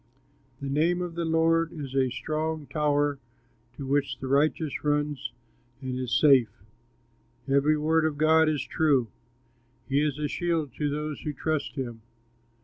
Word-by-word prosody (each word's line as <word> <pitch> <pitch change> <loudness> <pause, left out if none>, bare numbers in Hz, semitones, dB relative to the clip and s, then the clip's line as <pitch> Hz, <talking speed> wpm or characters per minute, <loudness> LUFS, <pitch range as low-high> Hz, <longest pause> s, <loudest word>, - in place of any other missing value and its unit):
The 140 - -5
name 160 +6 +1
of 175 -1 -4
the 170 0 -2
Lord 165 0 +2
is 140 -5 -7
a 135 -1 +2
strong 155 +4 -3
tower, 145 -1 0 0.6
To 140 - -5
which 140 +1 0
the - - -7
righteous 145 +2 +1
runs 145 -4 -1 0.5
and 130 -1 -4
is 125 -3 +1
safe. 135 -6 +6 1.0
Every 140 +3 +3
word 160 +1 +2
of 155 -2 -1
God 160 +1 +4
is 150 -2 -1
true; 140 -7 +1 0.8
He 140 +2 +2
is 150 -2 0
a 150 0 -1
shield 165 -4 -1
to 150 -1 0
those 150 +1 -3
who 150 - -3
trust 155 +1 -2
him. 120 -5 -5
150 Hz, 150 wpm, -27 LUFS, 135-160 Hz, 1.0 s, safe